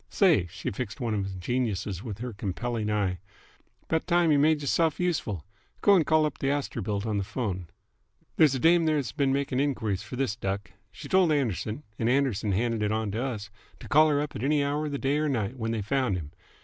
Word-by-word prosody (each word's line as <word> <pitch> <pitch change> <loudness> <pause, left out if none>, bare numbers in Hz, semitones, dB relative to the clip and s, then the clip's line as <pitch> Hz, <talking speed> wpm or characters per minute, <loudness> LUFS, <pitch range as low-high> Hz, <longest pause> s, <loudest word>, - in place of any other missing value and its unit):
Say!" 165 - +3
She - - -5
fixed 110 +3 -5
one 120 -4 -1
of 100 -2 -2
the 95 - -7
geniuses 105 -3 -2
with 110 -4 -6
her 120 +1 -5
compelling 105 +3 -3
eye. 100 -4 0 0.7
"'Bout 160 +1 0
time 175 -2 +3
y' - - +5
made 150 +2 +4
y'rself 160 +2 +1
useful. 140 - -1 0.4
Go'n 195 -5 +5
call 155 +1 +3
up 150 - -4
th' - - -3
Astorbilt 115 -7 -1
on 105 -2 0
th' - - -4
phone. 100 -7 -3 0.7
There's 150 -4 +5
a - - -1
dame 165 +3 +5
there 155 -1 +2
that's 140 -5 -1
been 140 -3 +1
making 135 -1 0
the - - +4
enquiries 110 -9 -1
f'r 115 +4 -8
this 130 -5 0
duck. 100 -2 -4 0.2
She - - -10
told 185 -3 +4
Anderson's 125 - -1 0.2
and 115 - +1
Anderson's 120 -7 +1
handed 115 +1 0
it 105 0 +1
on 110 -1 -1
to 110 +4 -2
us 105 -6 -4 0.3
to - - -10
call 155 +3 +5
her 145 -1 +2
up 150 - -5
any 140 +5 +1
hour 145 +2 -1
of - - -4
the 140 - -2
day 140 +2 0
'r 155 0 +1
night 115 -3 -1
when 110 -2 -2
they 115 -2 -1
found 130 -1 0
him. 75 -4 -7
125 Hz, 225 wpm, -27 LUFS, 105-145 Hz, 0.7 s, y